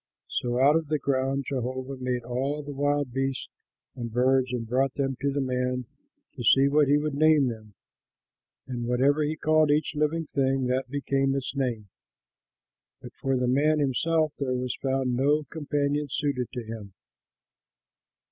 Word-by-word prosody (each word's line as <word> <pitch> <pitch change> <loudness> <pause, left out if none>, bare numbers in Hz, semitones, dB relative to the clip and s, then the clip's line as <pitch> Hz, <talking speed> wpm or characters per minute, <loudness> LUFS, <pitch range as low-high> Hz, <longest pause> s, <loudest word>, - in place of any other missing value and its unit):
So 120 0 -1
out 140 +3 +5
of 165 -2 0
the 155 +1 +1
ground 135 0 -1
Jehovah 130 0 -3
made 125 -1 -2
all 135 +5 -2
the 145 - -7
wild 145 -2 0
beasts 135 0 -2 0.5
and 120 -3 -5
birds, 130 +1 +2
and 120 -2 -3
brought 130 +3 +1
them 135 -1 -1
to 140 0 +1
the 140 +1 -1
man 125 -1 -1 0.5
to 125 - -7
see 135 +4 +5
what 145 +1 +3
he 145 +2 +4
would 150 0 -2
name 150 -2 +4
them; 110 -3 -9 0.9
and 120 -2 -4
whatever 135 +5 +2
he 150 +1 0
called 155 -1 +3
each 150 0 +1
living 155 +2 0
thing 135 -2 0
that 130 +1 -1
became 135 -1 0
its 135 +1 -3
name. 120 -7 -2 1.1
But - - -11
for 135 -1 -1
the 125 0 0
man 145 +5 +3
himself 155 +3 +1
there 130 -3 -1
was 125 0 -2
found 130 -2 0
no 145 +4 +2
companion 145 0 -1
suited 135 -3 -1
to 125 -3 -4
him. 110 -3 -8
135 Hz, 165 wpm, -27 LUFS, 125-145 Hz, 1.1 s, out